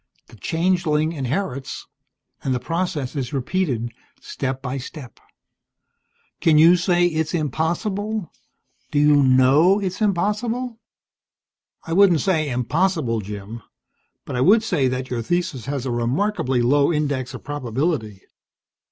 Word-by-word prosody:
The -, -, -15 dB
changeling 160 Hz, -, 0 dB
inherits, 135 Hz, -1 st, -3 dB, 0.6 s
and 130 Hz, -1 st, 0 dB
the -, -, -1 dB
process 165 Hz, -2 st, -3 dB
is 130 Hz, -2 st, -3 dB
repeated, 130 Hz, -4 st, -1 dB, 0.3 s
step 130 Hz, 0 st, -4 dB
by 130 Hz, +1 st, -4 dB
step. 130 Hz, -1 st, -10 dB, 1.2 s
Can 155 Hz, -2 st, +4 dB
you 165 Hz, +3 st, +7 dB
say 175 Hz, 0 st, +2 dB
it's 160 Hz, -1 st, -1 dB
impossible? 180 Hz, -, -2 dB, 0.6 s
Do -, -, -2 dB
you 150 Hz, 0 st, +5 dB
know 135 Hz, +9 st, +5 dB
it's 190 Hz, 0 st, -4 dB
impossible?" 225 Hz, +5 st, -1 dB, 1.0 s
"I 165 Hz, -, -4 dB
wouldn't 180 Hz, -4 st, +5 dB
say 160 Hz, -6 st, +1 dB
impossible, 130 Hz, -, 0 dB
Jim. 105 Hz, +3 st, -8 dB, 0.6 s
But -, -, -5 dB
I 125 Hz, -, 0 dB
would 215 Hz, -, +5 dB
say 160 Hz, -11 st, +1 dB
that 130 Hz, 0 st, -3 dB
your 120 Hz, -2 st, -1 dB
thesis 170 Hz, -3 st, -2 dB
has 140 Hz, -2 st, -3 dB
a 130 Hz, -, -2 dB
remarkably 125 Hz, -, 0 dB
low 140 Hz, +5 st, +3 dB
index 140 Hz, -5 st, -2 dB
of -, -, -10 dB
probability. 130 Hz, -, -2 dB
150 Hz, 125 wpm, -22 LUFS, 130-180 Hz, 1.2 s, you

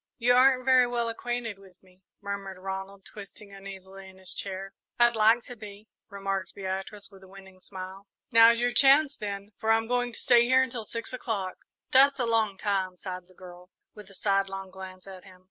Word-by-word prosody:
"You 245 Hz, 0 st, +3 dB
aren't 255 Hz, 0 st, +4 dB
very 255 Hz, -1 st, +5 dB
well 235 Hz, -1 st, -1 dB
acquainted 230 Hz, -2 st, -4 dB
with 190 Hz, -1 st, -19 dB
me," 185 Hz, 0 st, -24 dB, 0.2 s
murmured 200 Hz, -1 st, -5 dB
Ronald, 195 Hz, +1 st, -7 dB
twisting 200 Hz, 0 st, -12 dB
uneasily 195 Hz, -1 st, -11 dB
in 190 Hz, -, -17 dB
his 190 Hz, -1 st, -6 dB
chair. 195 Hz, 0 st, -6 dB, 0.2 s
"I'd 240 Hz, 0 st, +4 dB
like 225 Hz, +2 st, +4 dB
to 245 Hz, -, -10 dB
be," 210 Hz, -1 st, -12 dB, 0.2 s
remarked 195 Hz, -2 st, -4 dB
Beatrice, 195 Hz, +2 st, -5 dB
with 195 Hz, -1 st, -16 dB
a 190 Hz, -, -15 dB
winning 190 Hz, 0 st, -15 dB
smile. 190 Hz, +1 st, -9 dB, 0.2 s
"Now's 230 Hz, 0 st, +7 dB
your 245 Hz, 0 st, +1 dB
chance, 280 Hz, +1 st, +5 dB
then, 200 Hz, -1 st, -6 dB
for 220 Hz, 0 st, +1 dB
I'm 225 Hz, 0 st, +3 dB
going 245 Hz, +1 st, -1 dB
to -, -, -6 dB
stay 240 Hz, -1 st, +5 dB
here 260 Hz, +1 st, +4 dB
until 235 Hz, -3 st, -5 dB
six 230 Hz, +3 st, -6 dB
o'clock." 205 Hz, -7 st, -4 dB, 0.3 s
"That's 275 Hz, +1 st, +6 dB
a 250 Hz, -, 0 dB
long 220 Hz, -4 st, +1 dB
time," 190 Hz, -3 st, -1 dB
sighed 180 Hz, -1 st, -7 dB
the 185 Hz, -, -22 dB
girl, 180 Hz, 0 st, -13 dB, 0.2 s
with 210 Hz, -2 st, -13 dB
a 195 Hz, -, -13 dB
sidelong 195 Hz, -1 st, -1 dB
glance 185 Hz, -1 st, -10 dB
at 190 Hz, -2 st, -11 dB
him. 185 Hz, -2 st, -16 dB
200 Hz, 195 wpm, -27 LUFS, 190-235 Hz, 0.3 s, Now's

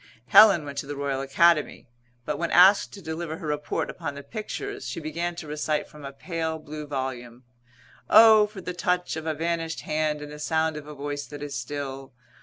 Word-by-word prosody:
Helen 200 Hz, -8 st, +7 dB
went 140 Hz, -1 st, -5 dB
to 140 Hz, -, -6 dB
the 145 Hz, -, -5 dB
Royal 140 Hz, -1 st, -2 dB
Academy, 150 Hz, +3 st, +2 dB, 0.4 s
but 150 Hz, -1 st, -3 dB
when 170 Hz, -, -1 dB
asked 190 Hz, +3 st, +6 dB
to 195 Hz, -, -11 dB
deliver 160 Hz, 0 st, -5 dB
her -, -, -9 dB
report 150 Hz, 0 st, -2 dB
upon 145 Hz, -, -6 dB
the 140 Hz, -, -8 dB
pictures 400 Hz, -, -6 dB
she -, -, -5 dB
began 170 Hz, +3 st, -3 dB
to 170 Hz, -, -7 dB
recite 150 Hz, 0 st, -2 dB
from 150 Hz, -2 st, -12 dB
a 135 Hz, -, -6 dB
pale 160 Hz, +2 st, -4 dB
blue 155 Hz, -1 st, -8 dB
volume, 130 Hz, -3 st, -5 dB, 0.7 s
"O! 220 Hz, -1 st, +8 dB
for 205 Hz, -2 st, -10 dB
the 180 Hz, 0 st, -5 dB
touch 180 Hz, 0 st, -1 dB
of 160 Hz, 0 st, -6 dB
a 160 Hz, -, -1 dB
vanished 165 Hz, 0 st, -2 dB
hand 155 Hz, -1 st, -1 dB
and 150 Hz, -, -9 dB
the 150 Hz, -, -9 dB
sound 160 Hz, +1 st, 0 dB
of 150 Hz, -1 st, -8 dB
a 150 Hz, -, -9 dB
voice 145 Hz, 0 st, -5 dB
that 145 Hz, 0 st, -8 dB
is 145 Hz, -1 st, -5 dB
still. 135 Hz, +1 st, -6 dB
155 Hz, 205 wpm, -26 LUFS, 145-170 Hz, 0.7 s, O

